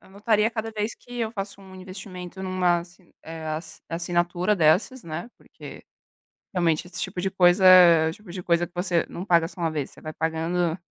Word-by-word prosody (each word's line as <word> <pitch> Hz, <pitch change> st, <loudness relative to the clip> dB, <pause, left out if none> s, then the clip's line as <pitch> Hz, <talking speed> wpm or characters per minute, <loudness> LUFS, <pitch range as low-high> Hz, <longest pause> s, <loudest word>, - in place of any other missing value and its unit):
anotaria 210 Hz, +2 st, +1 dB
cada 225 Hz, -1 st, -4 dB
vez 215 Hz, 0 st, -3 dB
que 245 Hz, 0 st, -11 dB
eu 225 Hz, -1 st, -2 dB
faço 200 Hz, -2 st, -6 dB
um 190 Hz, -1 st, -14 dB
investimento 185 Hz, -1 st, -9 dB
numa 185 Hz, -2 st, +1 dB
assi 175 Hz, +1 st, -13 dB
eh, 160 Hz, 0 st, -8 dB
ass 155 Hz, +1 st, -6 dB
assinatura 175 Hz, +3 st, 0 dB
dessas, 185 Hz, -, +2 dB
né, 170 Hz, +7 st, -6 dB
porque -, -, -12 dB, 0.7 s
realmente 170 Hz, -2 st, +1 dB
esse 180 Hz, +1 st, -7 dB
tipo 185 Hz, -1 st, -4 dB
de 190 Hz, +1 st, -1 dB
coisa, 185 Hz, +1 st, +4 dB
é 170 Hz, -3 st, +8 dB
o -, -, -5 dB
tipo 210 Hz, +1 st, -16 dB
de 180 Hz, -1 st, -6 dB
coisa 170 Hz, 0 st, +1 dB
que 175 Hz, -, -34 dB
você 175 Hz, -1 st, +1 dB
não 180 Hz, -, -6 dB
paga 170 Hz, -4 st, +3 dB
só 175 Hz, -, -14 dB
uma 165 Hz, -1 st, 0 dB
vez, 150 Hz, -3 st, -3 dB
você -, -, -16 dB
vai 155 Hz, -, -7 dB
pagando 165 Hz, +2 st, -1 dB
180 Hz, 200 wpm, -25 LUFS, 170-195 Hz, 0.7 s, é